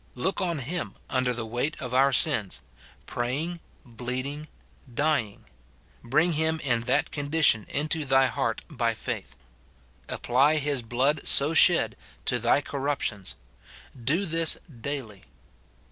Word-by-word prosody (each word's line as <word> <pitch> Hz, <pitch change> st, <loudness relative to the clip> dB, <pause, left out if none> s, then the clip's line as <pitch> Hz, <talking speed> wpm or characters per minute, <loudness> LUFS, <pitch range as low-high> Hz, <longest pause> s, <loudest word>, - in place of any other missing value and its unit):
Look 185 Hz, +12 st, -1 dB
on 170 Hz, -3 st, -1 dB
him 155 Hz, +6 st, -4 dB, 0.2 s
under 130 Hz, -2 st, +1 dB
the 120 Hz, -1 st, -4 dB
weight 120 Hz, +7 st, -2 dB
of 125 Hz, -1 st, -6 dB
our 135 Hz, +2 st, +4 dB
sins, 130 Hz, -, +3 dB, 0.4 s
praying, 145 Hz, +9 st, -3 dB, 0.3 s
bleeding, 130 Hz, +5 st, -5 dB, 0.4 s
dying; 135 Hz, -6 st, 0 dB, 0.6 s
bring 155 Hz, +8 st, +2 dB
him 160 Hz, +1 st, 0 dB
in 120 Hz, -5 st, +1 dB
that -, -, +2 dB
condition 145 Hz, -6 st, +2 dB
into 155 Hz, +2 st, -1 dB
thy 135 Hz, -1 st, +4 dB
heart 125 Hz, -, -2 dB
by -, -, -1 dB
faith; -, -, -5 dB, 0.7 s
apply 135 Hz, +6 st, +2 dB
his 145 Hz, -3 st, 0 dB
blood 130 Hz, +6 st, 0 dB
so 145 Hz, +3 st, +4 dB
shed 155 Hz, -, +5 dB, 0.3 s
to 125 Hz, -, +1 dB
thy 120 Hz, +5 st, +2 dB
corrup 140 Hz, +1 st, -2 dB
tions: 100 Hz, -3 st, -3 dB, 0.7 s
do 165 Hz, -, +1 dB
this 165 Hz, -1 st, +2 dB
daily. 125 Hz, -, -6 dB
140 Hz, 130 wpm, -27 LUFS, 120-155 Hz, 0.7 s, shed